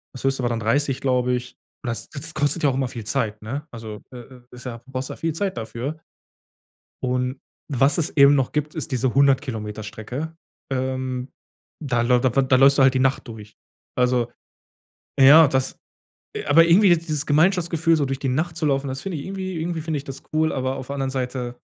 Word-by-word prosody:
das 130 - -8
höchste 135 -1 0
war 120 - +1
dann 115 -1 -2
30, 135 +4 0
glaube 125 -1 +1
ich. 125 0 -4 0.3
Das 120 -2 -4
das 160 +3 -5
kostet 155 +2 0
ja 145 - +5
auch - - 0
immer 130 -1 0
viel 120 -3 -7
Zeit, 105 0 -2
ne? 140 +8 -5
Also, 110 -2 -8
äh, - - -8
äh, 125 +1 -14
ist 125 +1 -12
ja 115 -2 -6
brauchst 130 0 -5
ja - - -7
viel 165 -1 -2
Zeit 190 -1 -2
dafür. 120 +7 -5 1.1
Und 125 +1 -1 0.3
was 135 +3 +3
es 165 -1 -2
eben 140 0 +7
noch 135 -3 +1
gibt, 150 0 -2
ist 155 - -4
diese 130 0 0
100- 140 0 +4
Kilometer-Strecke. 110 +5 -6 0.4
Ähm, 130 0 -3 0.5
da 125 -4 0
läuft 125 +1 +3
wa 130 +2 +3
da 130 0 +3
läufst 135 +2 +6
du 135 - +5
halt 130 0 +5
die 130 - +1
Nacht 135 0 +1
durch. 105 -2 -10 0.4
Also 125 -1 +1 0.9
ja, 145 +3 +9
das 130 -1 -1 0.6
äh, - - -4
aber 165 +3 +6
irgendwie 190 +4 +6
ist 170 -1 +2
dieses 150 -1 -2
Gemeinschaftsgefühl, 165 +1 +3
so 145 - +1
durch 135 0 -3
die 140 - -2
Nacht 155 +6 -1
zu 155 - -1
laufen, 135 -1 0
das 130 +1 -5
finde 180 -6 -4
ich 140 - -7
irgendwie 190 -3 -4
irgendwie 165 0 -2
finde 155 -2 -2
ich 140 - -8
das 135 - -8
cool, 155 0 +2
aber 130 0 -2
auf 130 0 -8
der 140 - -4
anderen 135 -1 -2
Seite, 125 -2 -4
135 Hz, 210 wpm, -23 LUFS, 125-150 Hz, 1.1 s, ja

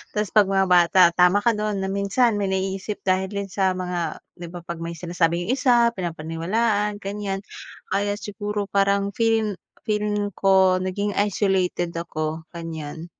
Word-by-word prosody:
Tapos, 210 -2 0
'pag 210 -3 +5
mga 195 0 +3
bata, 180 0 +5
tama 180 +3 +4
ka 235 - +4
don 210 -1 -2
na - - -1
minsan 200 +4 +2
may 195 -1 -1
naiisip 190 +2 -3
dahil 190 0 +1
din 200 -1 -4
sa 190 -1 +1
mga 180 -2 -3 0.2
'di 175 - -7
ba, 175 0 -8
'pag 170 -1 -6
may 170 0 -5
sinasabi 170 0 0
'yung 245 - +1
isa 240 -3 +3
pinapaniwalaan, 190 +5 -1
ganiyan. 195 -1 -4 0.5
Kaya 205 0 0
siguro 205 0 -4
parang 200 0 +2
feel 225 -2 +1 0.3
feeling 210 -2 -1
ko 190 -1 +3
naging 200 +2 -2
isolated 190 -4 0
ako 160 -1 -4
ganiyan. 165 -1 -7
195 Hz, 155 wpm, -23 LUFS, 175-205 Hz, 0.5 s, pag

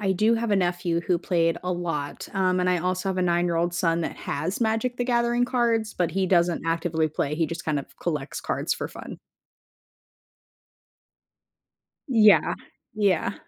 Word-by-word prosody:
I 195 -2 0
do 215 +5 +3
have 230 -1 -1
a 205 - +3
nephew 175 -2 0
who 175 +1 0
played 165 -2 +1
a 180 - -2
lot, 165 -5 -4
um, 185 -1 +2
and 180 0 +1
I 180 -1 +2
also 185 +2 -1
have 190 - -1
a 185 - +1
nine-year-old 175 -1 +1
son 170 -1 +1
that 165 - -4
has 180 +8 -3
Magic: 225 +2 0
The 245 - -1
Gathering 240 0 +2
cards, 235 -3 0
but 175 -2 0
he 190 0 0
doesn't 175 -2 +2
actively 165 -1 0
play, 150 -1 -2
he 165 0 +1
just 160 +1 -6
kind 150 -2 0
of 140 - -9
collects 150 -5 -3
cards - - -1
for - - -5
fun. - - -9 2.9
Yeah. 220 -5 +5 0.4
Yeah. 200 -3 +1
180 Hz, 170 wpm, -25 LUFS, 170-210 Hz, 2.9 s, Yeah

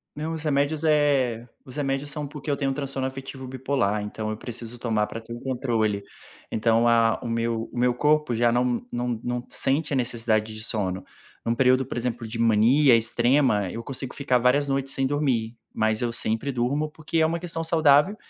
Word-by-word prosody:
Não, 155 +2 -4
os 160 -1 -5
remédios, 145 +1 0
eh, 140 -7 +2 0.2
os 130 - -9
remédios 140 0 -2
são 150 -1 -4
porque 150 +1 -8
eu - - +2
tenho 140 -1 -1
um - - 0
transtorno 135 -1 -2
afetivo 135 0 -7
bipolar, 130 -5 -1
então 110 +1 -4
eu 110 - -3
preciso 120 0 -7
tomar 110 -3 0
para 115 - -6
ter 115 +1 -9
o 120 - -7
controle, 115 -6 -1 0.5
então 115 +1 +2
a 115 -1 +3
o - - -4
meu 115 0 -1
o - - -7
meu 125 0 +2
corpo 150 -2 +2
já 120 +1 +3
não 120 0 0
não 120 -1 -2
não 125 0 -2
sente 150 +3 0
a - - +1
necessidade 115 -3 0
de 110 0 -4
sono. 95 -4 -2 0.4
Em - - -1
um 115 - +2
período, 130 +1 +4
por 120 - -6
exemplo, 120 -1 -3
de 115 +1 -6
mania 115 +4 +5
extrema, 120 -3 +2
eu 115 - -6
consigo 130 0 -4
ficar 135 -3 +1
várias 125 +4 +3
noites 135 0 -1
sem 135 0 0
dormir, 125 -6 -1 0.2
mas 110 0 +1
eu 120 -1 -1
sempre 115 +4 0
durmo, 140 +5 -1
porque 155 +1 -4
é 160 - +4
uma 165 +1 -1
questão 165 -1 -4
saudável, 160 +2 +4
125 Hz, 205 wpm, -25 LUFS, 115-140 Hz, 0.5 s, mania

